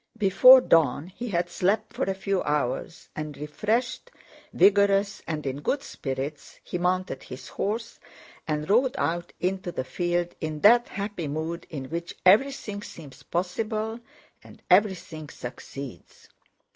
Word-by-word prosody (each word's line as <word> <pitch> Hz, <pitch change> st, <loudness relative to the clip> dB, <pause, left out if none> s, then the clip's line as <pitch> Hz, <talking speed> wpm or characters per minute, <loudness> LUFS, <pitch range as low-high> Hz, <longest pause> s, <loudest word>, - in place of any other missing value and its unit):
Before 255 Hz, +6 st, +8 dB
dawn 160 Hz, -, +3 dB
he 240 Hz, +6 st, -7 dB
had 175 Hz, -3 st, 0 dB
slept 190 Hz, +4 st, 0 dB
for -, -, -1 dB
a 195 Hz, -, -1 dB
few 195 Hz, 0 st, -1 dB
hours, 145 Hz, +2 st, -2 dB
and 150 Hz, -2 st, -5 dB
refreshed, 225 Hz, -, -2 dB, 0.4 s
vigorous, 200 Hz, 0 st, +3 dB
and 155 Hz, -2 st, -3 dB
in 135 Hz, +1 st, -3 dB
good 275 Hz, -, -1 dB
spirits, 135 Hz, -, -6 dB
he 180 Hz, -, -4 dB
mounted 185 Hz, +1 st, -1 dB
his 130 Hz, +1 st, -10 dB
horse 225 Hz, +3 st, -3 dB, 0.5 s
and 150 Hz, -1 st, -2 dB
rode 250 Hz, +6 st, +3 dB
out 170 Hz, +1 st, -1 dB
into 185 Hz, 0 st, -2 dB
the 130 Hz, -, -3 dB
field 175 Hz, +4 st, -1 dB
in 155 Hz, -1 st, -4 dB
that 240 Hz, +3 st, +6 dB
happy 200 Hz, -5 st, -4 dB
mood 160 Hz, +4 st, -4 dB
in 140 Hz, -4 st, -5 dB
which 170 Hz, +1 st, -4 dB
everything 210 Hz, 0 st, +3 dB
seems 150 Hz, -9 st, -11 dB
possible 215 Hz, +5 st, -2 dB, 0.4 s
and -, -, -16 dB
everything 180 Hz, -6 st, +2 dB
succeeds. 125 Hz, -, -9 dB
180 Hz, 135 wpm, -26 LUFS, 150-205 Hz, 0.5 s, Before